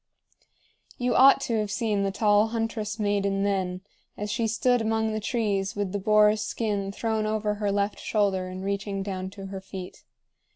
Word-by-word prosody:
You 245 Hz, 0 st, 0 dB
ought 270 Hz, +1 st, +7 dB
to 230 Hz, -5 st, 0 dB
have 210 Hz, -1 st, -2 dB
seen 210 Hz, -2 st, 0 dB
the 195 Hz, -, +1 dB
tall 205 Hz, +1 st, +3 dB
huntress 225 Hz, -2 st, -3 dB
maiden 200 Hz, -2 st, 0 dB
then, 185 Hz, -2 st, -1 dB, 0.4 s
as 210 Hz, 0 st, -3 dB
she 230 Hz, 0 st, 0 dB
stood 240 Hz, +2 st, +2 dB
among 220 Hz, 0 st, 0 dB
the 215 Hz, -, -1 dB
trees 205 Hz, -4 st, -1 dB
with 205 Hz, -2 st, -2 dB
the 205 Hz, -, -2 dB
boar's 210 Hz, +1 st, +4 dB
skin 205 Hz, -4 st, -2 dB
thrown 220 Hz, +1 st, -1 dB
over 215 Hz, -1 st, 0 dB
her 205 Hz, -1 st, -1 dB
left 200 Hz, +1 st, -1 dB
shoulder 195 Hz, -4 st, 0 dB
and 185 Hz, +1 st, -7 dB
reaching 200 Hz, 0 st, -2 dB
down 190 Hz, -1 st, -4 dB
to 195 Hz, 0 st, -9 dB
her 195 Hz, 0 st, -6 dB
feet. 190 Hz, -1 st, -9 dB
205 Hz, 175 wpm, -26 LUFS, 195-220 Hz, 0.4 s, ought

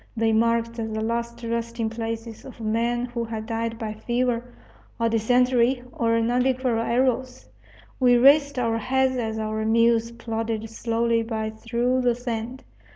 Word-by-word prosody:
They 225 Hz, 0 st, +2 dB
marked 230 Hz, +1 st, +2 dB
the 230 Hz, -1 st, -4 dB, 0.2 s
last 235 Hz, +1 st, -3 dB
resting 230 Hz, 0 st, -2 dB
places 225 Hz, 0 st, -5 dB
of 260 Hz, -, -12 dB
men 235 Hz, +2 st, 0 dB
who 240 Hz, -1 st, -4 dB
had 220 Hz, -1 st, -5 dB
died 230 Hz, 0 st, -3 dB
by 220 Hz, -2 st, -4 dB
fever, 240 Hz, +2 st, -1 dB, 0.6 s
or 230 Hz, 0 st, +2 dB
dysentery, 245 Hz, +2 st, +2 dB
or 230 Hz, -1 st, +1 dB
Nhambiquara 245 Hz, 0 st, +1 dB
arrows. 255 Hz, -, 0 dB, 0.5 s
We 245 Hz, -1 st, +5 dB
raised 280 Hz, +2 st, +5 dB
our 230 Hz, -2 st, 0 dB
hats 260 Hz, +2 st, +1 dB
as 220 Hz, -2 st, -2 dB
our 215 Hz, 0 st, -2 dB
mules 230 Hz, +1 st, +3 dB
plodded 225 Hz, -1 st, -3 dB
slowly 230 Hz, 0 st, 0 dB
by 220 Hz, -1 st, -3 dB
through 235 Hz, +3 st, -1 dB
the 245 Hz, -1 st, +2 dB
sand. 245 Hz, +1 st, -5 dB
230 Hz, 145 wpm, -24 LUFS, 225-245 Hz, 0.6 s, We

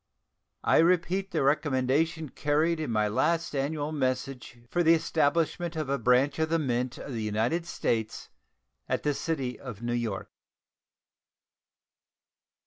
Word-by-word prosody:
I -, -, +4 dB
repeat 180 Hz, +3 st, +2 dB
the 160 Hz, -5 st, 0 dB
recommendation 145 Hz, +2 st, +1 dB
contained 155 Hz, +5 st, +1 dB
in 155 Hz, -4 st, -3 dB
my 105 Hz, -2 st, +2 dB
last 160 Hz, +9 st, 0 dB
annual 145 Hz, +2 st, -1 dB
message 130 Hz, -3 st, -2 dB
for 175 Hz, -, 0 dB
the 165 Hz, 0 st, +6 dB
establishment 165 Hz, +2 st, 0 dB
of 155 Hz, -4 st, -3 dB
a 140 Hz, -1 st, 0 dB
branch 125 Hz, +5 st, +3 dB
of 160 Hz, 0 st, +1 dB
the 165 Hz, -, +2 dB
Mint 125 Hz, -4 st, -1 dB
of 140 Hz, -, -7 dB
the 115 Hz, -, -3 dB
United 110 Hz, +11 st, 0 dB
States 110 Hz, -9 st, -2 dB, 0.6 s
at -, -, -1 dB
the 150 Hz, -, +1 dB
city 135 Hz, -5 st, -3 dB
of 120 Hz, -4 st, -8 dB
New 120 Hz, 0 st, -1 dB
York. 115 Hz, -5 st, -3 dB
145 Hz, 135 wpm, -28 LUFS, 125-160 Hz, 0.6 s, the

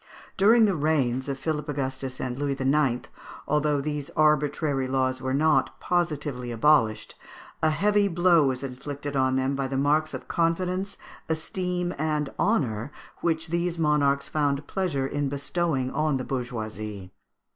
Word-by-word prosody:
During 220 Hz, +4 st, +6 dB
the 200 Hz, -3 st, +1 dB
reigns 140 Hz, -4 st, +1 dB
of 135 Hz, -, -2 dB
Philip 150 Hz, 0 st, -3 dB
Augustus 130 Hz, -2 st, -3 dB
and 125 Hz, 0 st, -3 dB
Louis 140 Hz, -1 st, -1 dB
IX., 135 Hz, -2 st, +1 dB, 0.4 s
although 150 Hz, -1 st, +2 dB
these 145 Hz, 0 st, -3 dB
arbitrary 150 Hz, -2 st, +2 dB
laws 130 Hz, 0 st, 0 dB
were 130 Hz, 0 st, -2 dB
not 155 Hz, +3 st, +2 dB
positively 150 Hz, -8 st, -1 dB
abolished, 115 Hz, -3 st, +2 dB, 0.5 s
a 155 Hz, -, +4 dB
heavy 205 Hz, +6 st, +2 dB
blow 175 Hz, -4 st, +4 dB
was 130 Hz, 0 st, -2 dB
inflicted 140 Hz, +2 st, -5 dB
on 130 Hz, -1 st, +2 dB
them 130 Hz, +1 st, 0 dB
by 135 Hz, -1 st, -1 dB
the 135 Hz, 0 st, -2 dB
marks 150 Hz, +3 st, +1 dB
of -, -, -8 dB
confidence, 185 Hz, +3 st, -1 dB, 0.3 s
esteem, 180 Hz, +2 st, -1 dB
and 150 Hz, -2 st, -1 dB
honour 130 Hz, -, 0 dB, 0.3 s
which 160 Hz, -1 st, -1 dB
these 170 Hz, +1 st, -1 dB
monarchs 145 Hz, -3 st, +2 dB
found 145 Hz, -1 st, 0 dB
pleasure 165 Hz, -9 st, -1 dB
in 145 Hz, 0 st, -1 dB
bestowing 140 Hz, -1 st, -1 dB
on 155 Hz, -3 st, +1 dB
the 130 Hz, -, -3 dB
bourgeoisie. 110 Hz, -6 st, -5 dB
145 Hz, 145 wpm, -26 LUFS, 130-160 Hz, 0.5 s, During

